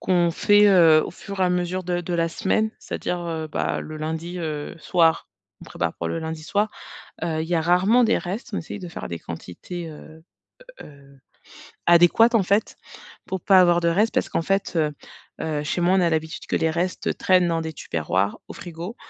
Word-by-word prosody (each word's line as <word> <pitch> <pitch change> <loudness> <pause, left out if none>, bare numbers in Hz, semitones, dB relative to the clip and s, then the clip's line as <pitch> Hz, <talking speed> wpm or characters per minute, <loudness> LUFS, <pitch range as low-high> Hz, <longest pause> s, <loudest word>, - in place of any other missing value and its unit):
qu'on 175 -2 +2
fait, 205 +4 +4
heu, 165 -5 +6
au - - -6
fur 200 +2 -8
et - - +4
à 180 - +2
mesure 180 +1 -1
de 175 0 -1
de 175 0 -4
la 165 0 +1
semaine. 215 +6 0
C'est-à-dire, 180 - -4
heu, 160 -1 -3
bah, 150 - -2
le 155 0 -8
lundi, 160 +3 -4
heu, 155 -3 -4
soir, 165 +1 +2 0.3
on - - -11
prépare 85 -2 -2
pour 85 - -4
le - - -2
lundi 160 -1 -5
soir, 205 +6 0 0.5
heu, 160 -2 -1
il 160 - -4
y 175 - 0
a 160 - +1
rarement 190 +8 +4
des 230 - +2
restes. 195 +7 -6
On - - -1
essaie 185 - -7
de 180 - -8
faire 165 - -7
des 85 - -5
quantités, 90 - -8
heu 155 +1 -13 0.6
heu, 140 -1 -15 0.7
adéquates 175 +8 +6
en 210 - +4
fait 200 +4 0 0.5
pour 190 -1 -4
pas 190 +1 +6
avoir 175 -1 +5
de 170 - +1
reste. 205 +7 +2
Parce - - 0
qu'en 165 - -1
fait, 195 +2 -1
heu 150 -2 +1 0.5
heu, 150 -2 -2
chez 160 +4 -2
moi, 180 +2 +3
on - - +3
a 170 - +3
l'habitude 160 0 -3
que - - -2
les 160 - +1
restes 175 +3 -2
traînent 185 -1 +3
dans 165 -1 0
des 160 0 -5
Tupperware 95 - -2
au - - -8
frigo 175 +5 -8
170 Hz, 210 wpm, -23 LUFS, 160-185 Hz, 0.7 s, heu